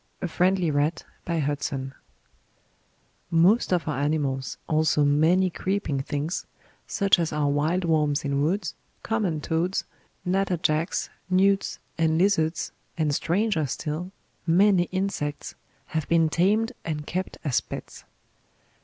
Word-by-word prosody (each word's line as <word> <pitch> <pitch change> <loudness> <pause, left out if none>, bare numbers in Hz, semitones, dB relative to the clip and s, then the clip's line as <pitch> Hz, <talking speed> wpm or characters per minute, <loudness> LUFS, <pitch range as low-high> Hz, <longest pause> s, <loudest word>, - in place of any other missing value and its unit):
A - - -2
FRIENDLY 180 -1 +2
RAT 145 +3 0 2.3
Most 180 +8 +4
of 175 -3 +1
our 150 -4 -1
animals, 140 -3 -1
also 155 -2 +3
many 165 +6 +3
creeping 185 -8 -1
things, 145 +5 -3 0.4
such 195 -2 +3
as 165 -2 0
our 150 -1 0
"wilde 155 +6 +1
wormes 150 -2 +1
in 140 0 0
woods," 175 +3 0 0.3
common 200 -9 -1
toads, 170 +5 0 0.4
natter 190 0 +1
jacks, 155 +1 0 0.2
newts, 195 +2 +2 0.2
and 160 -1 +3
lizards, 170 -3 +1 0.3
and 155 -3 +1
stranger 170 0 +1
still, 155 +6 -4 0.4
many 185 +1 +5
insects, 185 -6 -2 0.4
have 160 -2 -2
been 165 -1 +4
tamed 210 +8 +2
and 150 -2 -3
kept 185 +4 -3
as 140 -5 +1
pets. - - -9
165 Hz, 120 wpm, -26 LUFS, 150-185 Hz, 2.3 s, many